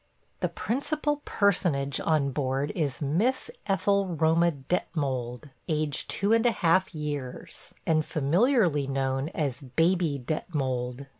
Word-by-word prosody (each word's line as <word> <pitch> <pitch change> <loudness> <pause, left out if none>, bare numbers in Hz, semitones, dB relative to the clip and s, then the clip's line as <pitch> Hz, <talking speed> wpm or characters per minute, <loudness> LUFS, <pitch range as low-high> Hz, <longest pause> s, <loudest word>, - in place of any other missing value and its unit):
The - - 0
principal 295 +4 -1
personage 170 -9 +1
on 150 -4 +1
board 135 +1 -1
is 150 -7 -2
Miss 200 - 0 0.2
Ethel 200 0 +2
Roma 165 0 +3
Detmold, 135 -3 -3 0.2
aged 155 -3 -1
two 200 +3 +2
and 230 0 +4
a - - +4
half 185 -2 +2
years, 145 -4 -5
and 155 -1 +3
familiarity 165 - +2
known 135 +1 -1
as 145 -6 -2
Baby 165 +3 +1
Detmold. 130 -4 -2
155 Hz, 120 wpm, -27 LUFS, 140-185 Hz, 0.2 s, and